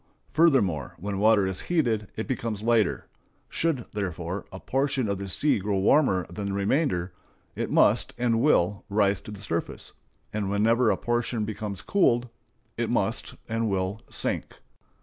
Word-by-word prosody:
Furthermore, 130 - +3
when 100 +1 -4
water 105 -1 +5
is 95 -1 -3
heated 120 - 0
it 110 - -3
becomes 115 -5 -3
lighter. 115 -2 +2 0.4
Should, 155 -8 -1
therefore, 95 -2 -4
a 95 - -8
portion 135 -1 0
of 100 -1 -2
the 100 0 -5
sea 145 +6 +2
grow 100 +1 -1
warmer 95 - +3
than 100 +3 -6
the 100 - -2
remainder, 100 - 0 0.4
it - - -2
must - - +3
and 120 -2 +1
will 100 - +2
rise 100 -1 +2
to - - -11
the 105 -2 -8
surface; 85 -4 -4 0.4
and 105 -2 -1
whenever 110 +4 +3
a - - +2
portion 120 -2 -1
becomes 105 -2 -5
cooled, 125 -11 +2 0.5
it - - -1
must - - -1
and 115 0 -1
will 95 +2 -1
sink. - - -2
105 Hz, 155 wpm, -26 LUFS, 95-120 Hz, 0.5 s, water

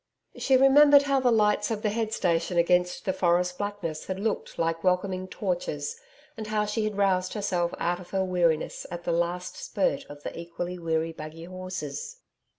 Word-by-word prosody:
She 265 -1 +3
remembered 285 +2 +7
how 275 -1 +2
the 255 -1 +3
lights 210 -2 +3
of 220 -2 -3
the 210 - +1
head 220 0 -1
station 175 -2 0
against 180 +1 +2
the 190 - +1
forest 180 0 +1
blackness 205 -6 -4
had 190 0 -3
looked 215 +1 -2
like 165 0 -1
welcoming 185 0 0
torches - - -3 0.4
and 220 -1 -6
how 210 0 0
she 215 +1 -1
had 210 -2 -3
roused 185 -1 +1
herself 180 -4 0
out 175 +1 -1
of 180 - -12
her 190 -1 0
weariness 170 -4 0
at 175 0 -6
the 175 - -1
last 170 +2 -1
spurt 190 -8 -1
of 145 0 -12
the - - -5
equally 175 +1 -5
weary 165 -1 -1
buggy 160 +1 -9
horses. 185 - -6
185 Hz, 180 wpm, -27 LUFS, 170-215 Hz, 0.4 s, remembered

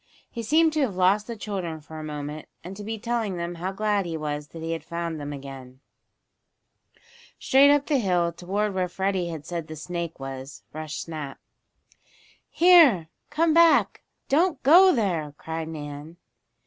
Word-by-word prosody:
He 235 - -5
seemed 315 +7 +3
to 310 - 0
have 235 -9 0
lost 190 +3 +2
the 235 - -5
children 190 -7 -4
for 155 +1 -10
a - - -7
moment 150 0 -6 0.2
and 180 +3 -8
to 205 - -8
be 220 +2 -4
telling 225 -4 -2
them 170 0 -4
how 185 +2 -2
glad 205 -1 0
he 165 -1 -3
was 150 -1 -4
that 160 +1 -10
he 165 - -3
had 165 - -4
found 170 -2 -4
them 145 0 -5
again. 135 -2 -9 1.6
Straight 275 +2 +5
up 290 -1 +4
the 290 -4 +1
hill, 180 -5 +1
toward 195 +5 -2
where 185 -1 -1
Freddie 190 -1 -1
had 160 -3 -6
said 170 -1 -5
the 155 - -7
snake 170 0 -5
was, 135 +1 -8
rushed 155 0 -5
Snap. 150 -5 -7 1.1
"Here! 315 - +6 0.2
Come 325 0 +2
back! 335 0 +4 0.3
Don't 325 +1 +1
go 360 +7 +8
there!" 170 - -1
cried 160 0 -5
Nan. 150 +1 -8
175 Hz, 170 wpm, -25 LUFS, 155-220 Hz, 1.6 s, go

